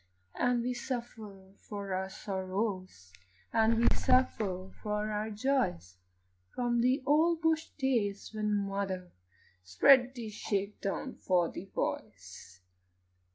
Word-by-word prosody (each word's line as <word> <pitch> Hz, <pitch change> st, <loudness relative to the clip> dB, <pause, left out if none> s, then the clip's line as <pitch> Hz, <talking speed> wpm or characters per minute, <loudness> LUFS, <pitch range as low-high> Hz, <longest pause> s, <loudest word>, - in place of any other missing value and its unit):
And 245 Hz, -1 st, +1 dB
we 250 Hz, +1 st, -1 dB
suffer 230 Hz, -7 st, -6 dB
for 200 Hz, -2 st, -6 dB
our 190 Hz, +1 st, -2 dB
sorrows, 190 Hz, -, -4 dB, 0.4 s
And 225 Hz, 0 st, +4 dB
we 235 Hz, -, +4 dB
suffer 195 Hz, -7 st, +1 dB
for 210 Hz, 0 st, -1 dB
our 210 Hz, +1 st, -2 dB
joys, 210 Hz, -, -1 dB, 0.6 s
From 240 Hz, -1 st, +1 dB
the 255 Hz, +3 st, +2 dB
old 320 Hz, +3 st, +3 dB
bush 320 Hz, 0 st, +2 dB
days 230 Hz, -8 st, 0 dB
when 215 Hz, -1 st, -1 dB, 0.2 s
mother 190 Hz, -2 st, -3 dB, 0.5 s
Spread 250 Hz, -, +5 dB
the 230 Hz, -3 st, -5 dB
shake 205 Hz, -1 st, -3 dB
down 225 Hz, +6 st, -3 dB
for 175 Hz, -3 st, +2 dB
the 185 Hz, -, -7 dB
boys. 95 Hz, -, -5 dB
210 Hz, 115 wpm, -31 LUFS, 190-245 Hz, 0.6 s, Spread